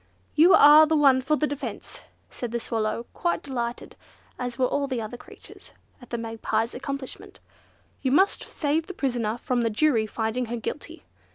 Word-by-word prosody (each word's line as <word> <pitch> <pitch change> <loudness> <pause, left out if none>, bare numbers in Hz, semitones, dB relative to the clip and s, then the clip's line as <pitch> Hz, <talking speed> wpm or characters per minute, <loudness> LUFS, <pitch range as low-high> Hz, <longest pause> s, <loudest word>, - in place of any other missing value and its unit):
"You 350 +5 +6
are 300 0 +8
the 320 - +1
one 275 -3 +5
for 290 +4 +1
the 305 - 0
defence!" 290 -1 -6 0.3
said 240 -2 -6
the 235 - -2
Swallow, 225 0 -2
quite 345 - -1
delighted, 240 -3 -5 0.4
as 245 -1 -4
were 255 - +2
all 280 +2 -1
the 260 -3 -2
other 220 +2 -6
creatures, - - -14 0.3
at 245 - -14
the 235 - -3
Magpie's 225 0 -2
accomplishment; 275 +1 -7 0.6
"you 260 - 0
must 380 +8 +3
save 310 +2 -1
the 380 - -8
prisoner 240 -5 -1
from 245 0 -1
the 230 - +1
jury 225 -1 +2
finding 225 +3 -2
her 240 +1 -4
guilty." 310 +8 -7
255 Hz, 175 wpm, -25 LUFS, 230-290 Hz, 0.6 s, are